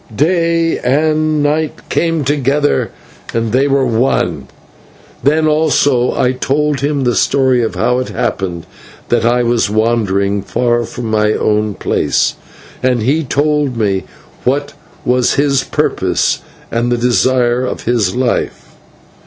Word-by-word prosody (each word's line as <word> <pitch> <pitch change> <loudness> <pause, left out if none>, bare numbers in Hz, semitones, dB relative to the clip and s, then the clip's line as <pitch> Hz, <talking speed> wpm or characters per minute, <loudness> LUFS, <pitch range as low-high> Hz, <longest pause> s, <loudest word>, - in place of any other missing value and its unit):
Day 165 - +1
and 155 +3 +1
Night 150 +1 -1
came 165 -2 0
together 145 +1 +1 0.5
and 115 -1 -1
they 135 +4 +2
were 135 -1 +2
one. 120 +2 0 0.7
Then, 155 +3 +2
also, 145 -5 +2
I 125 - +3
told 140 +2 0
him 145 0 -1
the 120 -1 +1
story 130 0 +2
of 115 - -2
how 125 +1 +1
it 130 - -4
happened 90 -3 -3 0.4
that 120 -1 +2
I 120 +1 +2
was 120 -3 +1
wandering 100 -3 0
far 120 +2 0
from 120 - -7
my 105 0 +2
own 105 -1 0
place, - - 0 0.5
and 125 -3 +1
he 150 +7 +1
told 145 -1 0
me 100 -4 0 0.4
what 140 +3 -1 0.3
was 125 0 +2
his 140 -2 +2
purpose - - 0 0.3
and 120 +1 0
the 120 - +2
desire 125 0 +2
of 130 - -4
his 110 -6 0
life. 125 0 -2
125 Hz, 135 wpm, -15 LUFS, 115-145 Hz, 0.7 s, I